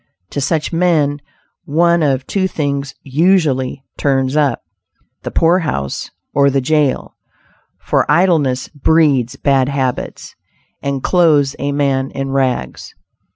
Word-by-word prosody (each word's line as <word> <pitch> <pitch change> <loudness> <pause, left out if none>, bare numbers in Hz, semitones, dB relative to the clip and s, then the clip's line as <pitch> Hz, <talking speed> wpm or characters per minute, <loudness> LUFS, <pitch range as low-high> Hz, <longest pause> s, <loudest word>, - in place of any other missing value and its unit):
To 140 - -3
such 155 +3 -1
men 155 -5 +1 0.4
one 170 +2 +2
of 135 -3 0
two 190 +4 0
things 140 -5 -3
usually 140 -4 +1
"turns 135 -1 +1
up:" 145 -5 +1 0.6
the - - -5
poorhouse 165 - 0 0.2
or 140 0 +4
the 135 0 +1
jail; 145 +1 0 0.6
for - - 0
idleness 150 -6 +2
breeds 145 -4 +2
bad 135 -1 +1
habits, 130 -3 -3 0.5
and 140 -2 -3
clothes 155 -6 +3
a 140 +1 -1
man 135 -2 0
in 135 0 -4
rags. 130 - -2
140 Hz, 115 wpm, -16 LUFS, 135-160 Hz, 0.6 s, or